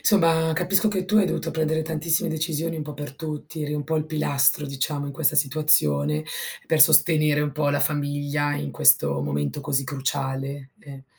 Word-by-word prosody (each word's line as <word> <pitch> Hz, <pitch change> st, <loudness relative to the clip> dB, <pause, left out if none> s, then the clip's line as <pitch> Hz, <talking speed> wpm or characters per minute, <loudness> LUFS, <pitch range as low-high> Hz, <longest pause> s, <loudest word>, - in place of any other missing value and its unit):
insomma, 165 Hz, -5 st, +3 dB
capisco 190 Hz, +6 st, +2 dB
che 190 Hz, -3 st, -2 dB
tu 210 Hz, +3 st, 0 dB
hai 205 Hz, -3 st, +4 dB
dovuto 165 Hz, -, -3 dB
prendere 160 Hz, 0 st, -1 dB
tantissime 160 Hz, +1 st, -1 dB
decisioni 160 Hz, +1 st, -2 dB
un 155 Hz, -, -4 dB
po' 150 Hz, -1 st, -8 dB
per 145 Hz, -1 st, -8 dB
tutti, 155 Hz, 0 st, -7 dB
eri 150 Hz, 0 st, -3 dB
un 145 Hz, -1 st, -4 dB
po' 160 Hz, +1 st, -1 dB
il 155 Hz, 0 st, -2 dB
pilastro, 150 Hz, -2 st, +1 dB
diciamo, 145 Hz, +1 st, -3 dB
in 140 Hz, -, -6 dB
questa 155 Hz, +1 st, 0 dB
situazione, 75 Hz, -, +2 dB, 0.4 s
per 160 Hz, -, +1 dB
sostenere 150 Hz, -1 st, +5 dB
un 145 Hz, -, -2 dB
po' 150 Hz, -1 st, -1 dB
la 145 Hz, -, 0 dB
famiglia 145 Hz, 0 st, -1 dB
in 70 Hz, -, -5 dB
questo 70 Hz, 0 st, +3 dB
momento 70 Hz, -, -3 dB
così 135 Hz, 0 st, -1 dB
cruciale 135 Hz, 0 st, -4 dB
e 135 Hz, -2 st, -12 dB
150 Hz, 180 wpm, -23 LUFS, 140-160 Hz, 0.4 s, sostenere